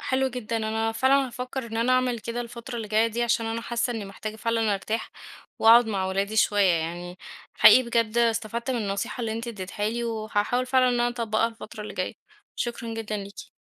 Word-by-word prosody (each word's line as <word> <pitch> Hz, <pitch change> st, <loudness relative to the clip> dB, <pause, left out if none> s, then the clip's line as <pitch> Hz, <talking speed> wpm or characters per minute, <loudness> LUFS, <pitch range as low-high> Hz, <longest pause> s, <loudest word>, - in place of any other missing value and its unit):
حلو 265 Hz, 0 st, 0 dB
جدًا، 235 Hz, -2 st, -4 dB
أنا 220 Hz, 0 st, -1 dB
فعلًا 265 Hz, +3 st, +3 dB
هافكّر 250 Hz, 0 st, -5 dB
إن 225 Hz, 0 st, -6 dB
أنا 240 Hz, +3 st, +2 dB
أعمل 255 Hz, -2 st, +2 dB
كده 235 Hz, +2 st, -4 dB
الفترة 235 Hz, +1 st, -7 dB
اللي 220 Hz, -2 st, -5 dB
جايّة 220 Hz, +2 st, +3 dB
دي 235 Hz, +1 st, -2 dB
عشان 235 Hz, -1 st, +1 dB
أنا 225 Hz, +1 st, -2 dB
حاسّة 235 Hz, +1 st, -1 dB
إنّي 220 Hz, -3 st, -4 dB
محتاجة 215 Hz, +2 st, -7 dB
فعلًا 225 Hz, -2 st, 0 dB
أرتاح، 220 Hz, +3 st, -3 dB, 0.5 s
وأقعد 230 Hz, +1 st, +7 dB
مع 195 Hz, -3 st, -1 dB
ولادي 200 Hz, +3 st, -1 dB
شويّة 205 Hz, -4 st, +4 dB
يعني 175 Hz, +2 st, -3 dB, 0.4 s
حقيقي 255 Hz, -, +8 dB
بجد 235 Hz, -1 st, 0 dB
استفدت 230 Hz, +1 st, 0 dB
من 250 Hz, -, 0 dB
النصيحة 200 Hz, +4 st, -3 dB
اللي 225 Hz, -2 st, -2 dB
أنتِ 230 Hz, +2 st, -4 dB
ادّتيها 205 Hz, 0 st, -3 dB
لي، 235 Hz, +1 st, -3 dB
وهاحاول 220 Hz, +2 st, -1 dB
فعلًا 255 Hz, 0 st, +4 dB
إن 245 Hz, -, +1 dB
أنا 240 Hz, -, +3 dB
أطبّقها 230 Hz, -2 st, 0 dB
الفترة 225 Hz, -1 st, -9 dB
اللي 210 Hz, -, -8 dB
جايّة، -, -, -3 dB, 0.4 s
شكرًا 235 Hz, -1 st, -3 dB
جدًا 215 Hz, -1 st, -3 dB
ليكِ. 200 Hz, 0 st, -9 dB
225 Hz, 200 wpm, -26 LUFS, 215-240 Hz, 0.5 s, حقيقي